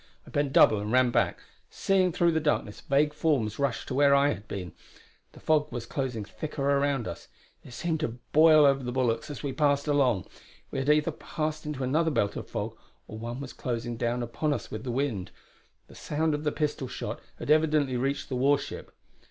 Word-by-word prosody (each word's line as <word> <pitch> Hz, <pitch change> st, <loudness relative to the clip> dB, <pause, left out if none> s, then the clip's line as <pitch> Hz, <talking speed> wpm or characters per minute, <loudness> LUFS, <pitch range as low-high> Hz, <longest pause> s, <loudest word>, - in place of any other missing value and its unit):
I -, -, -14 dB
bent 145 Hz, -1 st, 0 dB
double 110 Hz, -5 st, +6 dB
and 105 Hz, +1 st, -4 dB
ran 125 Hz, -1 st, +4 dB
back, -, -, +1 dB, 0.3 s
seeing 190 Hz, -2 st, +2 dB
through 170 Hz, +1 st, +2 dB
the 160 Hz, -, +1 dB
darkness 145 Hz, -9 st, -1 dB
vague 150 Hz, +2 st, +2 dB
forms 135 Hz, -9 st, 0 dB
rush 140 Hz, -4 st, -1 dB
to -, -, -5 dB
where 140 Hz, +1 st, +5 dB
I 140 Hz, +1 st, +4 dB
had 110 Hz, -6 st, -4 dB
been. 90 Hz, -5 st, -5 dB, 0.6 s
The -, -, -14 dB
fog 150 Hz, -1 st, +1 dB
was 120 Hz, -1 st, -5 dB
closing 125 Hz, -5 st, -3 dB
thicker 150 Hz, +4 st, -5 dB
around 140 Hz, -3 st, +1 dB
us; 85 Hz, -, -7 dB, 0.4 s
it -, -, -13 dB
seemed 160 Hz, +6 st, -2 dB
to 120 Hz, -7 st, -3 dB
boil 155 Hz, -1 st, +7 dB
over 135 Hz, -1 st, +4 dB
the 125 Hz, -, -3 dB
bulwarks 125 Hz, -1 st, 0 dB
as 145 Hz, -1 st, -7 dB
we 140 Hz, -2 st, -2 dB
passed 140 Hz, 0 st, +2 dB
along. 135 Hz, -9 st, +2 dB, 0.5 s
We -, -, -2 dB
had 135 Hz, +2 st, -1 dB
either 150 Hz, +2 st, +3 dB
passed 155 Hz, 0 st, -4 dB
into 145 Hz, -3 st, -3 dB
another 155 Hz, +6 st, +2 dB
belt 105 Hz, -8 st, 0 dB
of -, -, -6 dB
fog, -, -, -4 dB, 0.3 s
or 110 Hz, -, -8 dB
one 120 Hz, +2 st, -5 dB
was 140 Hz, -2 st, -7 dB
closing 120 Hz, -1 st, -3 dB
down 120 Hz, +1 st, -1 dB
upon 120 Hz, +6 st, -1 dB
us -, -, -7 dB
with -, -, -5 dB
the 130 Hz, -, -5 dB
wind. 120 Hz, -7 st, -2 dB, 0.6 s
The -, -, -17 dB
sound 155 Hz, +1 st, -1 dB
of 150 Hz, +1 st, -3 dB
the 150 Hz, -, +2 dB
pistol 150 Hz, -4 st, -2 dB
shot -, -, -5 dB, 0.2 s
had -, -, -2 dB
evidently 150 Hz, -4 st, +3 dB
reached 135 Hz, +3 st, -1 dB
the 130 Hz, -, -2 dB
war 140 Hz, +3 st, +4 dB
ship. 140 Hz, -, -8 dB
140 Hz, 210 wpm, -28 LUFS, 120-150 Hz, 0.6 s, boil